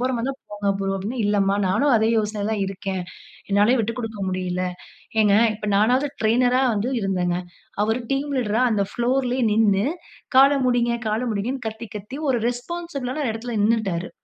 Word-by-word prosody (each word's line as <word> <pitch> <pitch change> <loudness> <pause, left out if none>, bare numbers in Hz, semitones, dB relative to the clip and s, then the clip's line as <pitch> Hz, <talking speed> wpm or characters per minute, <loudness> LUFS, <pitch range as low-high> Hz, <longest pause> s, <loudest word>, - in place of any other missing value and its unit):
போற 255 +1 +1
மாரி 230 +2 -2
இருந்தா 275 - -2 0.2
போங்க 205 -1 0
ப்ரோ." 195 0 -1
அப்படீன்னேன். 225 +5 -3
"இல்லம்மா 200 -1 +2
நானும் 245 +8 +3
அதே 220 +1 +2
யோசனையில 210 0 -2
தான் 205 -2 -1
இருக்கேன். 190 -1 -4 0.5
என்னாலயும் 210 +5 +4
விட்டுக்கொடுக்க 225 -1 -4
முடியல." 185 0 -2 0.6
ஏங்க 205 -2 +4 0.2
இப்ப 210 0 -7
நானாவது 250 +7 +3
டிரெய்னரா 245 +3 +3
வந்து 210 +5 -1
இருந்தேன்ங்க. 180 -3 0 0.4
அவர் 220 +3 +1
டீம் 285 +2 -1
லீடரா 225 0 0
அந்த 205 -2 +2
ஃபுளோர்லேயே 250 +1 0
நின்னு, 210 0 +3 0.5
கால 275 +1 +8 0.2
முடிங்க, 240 -1 +2 0.2
கால 215 +2 0
முடியுங்கன்னு 230 +4 -3
கத்தி 220 +2 -8
கத்தி 210 +7 -8
ஒரு 245 - +2
ரெஸ்பான்சிபிளான 280 +1 -4
ஒரு 225 - 0
இடத்துல 230 0 -5
நின்னுட்டாரு. 200 -6 0
220 Hz, 160 wpm, -23 LUFS, 200-250 Hz, 0.6 s, கால